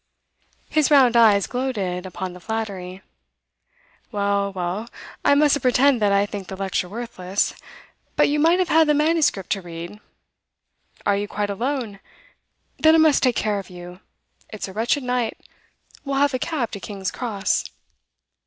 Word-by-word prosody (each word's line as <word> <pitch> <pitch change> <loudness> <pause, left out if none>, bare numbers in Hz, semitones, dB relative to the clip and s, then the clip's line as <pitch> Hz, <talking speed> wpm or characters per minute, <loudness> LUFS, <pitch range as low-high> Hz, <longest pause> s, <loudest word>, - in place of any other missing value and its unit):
His 310 -2 +2
round 265 -5 +5
eyes 215 -4 +5
gloated 200 -8 -3
upon 185 0 -6
the 180 - -11
flattery. 195 -3 -5 1.1
'Well, 200 -1 0
well, 190 +5 -4 0.3
I 285 - +5
mustn't 290 -1 +3
pretend 255 0 +3
that 205 -1 +3
I 200 0 +3
think 200 -2 -7
the 190 - -6
lecture 190 -2 -2
worthless. 205 -4 -2 0.6
But - - +4
you 295 +1 0
might 330 +4 +4
have 370 -2 0
had 320 -1 +5
the 300 - +3
manuscript 300 - +1
to 195 - 0
read. 170 +3 -8 1.1
Are 200 - +3
you 205 +1 -2
quite 205 -1 -2
alone? 230 -2 -3 0.8
Then 315 0 +6
I - - +6
must 315 -2 +4
take 250 -3 +2
care 210 -2 0
of 195 - -10
you. 180 0 -10 0.5
It's 215 - -6
a 190 - -9
wretched 235 +7 0
night; 250 -2 -1 0.7
we'll 275 -1 -3
have 285 0 +3
a 255 - -1
cab 280 -6 -2
to 200 - -6
King's 195 -1 -5
Cross. 215 -5 -1
215 Hz, 160 wpm, -22 LUFS, 195-270 Hz, 1.1 s, Then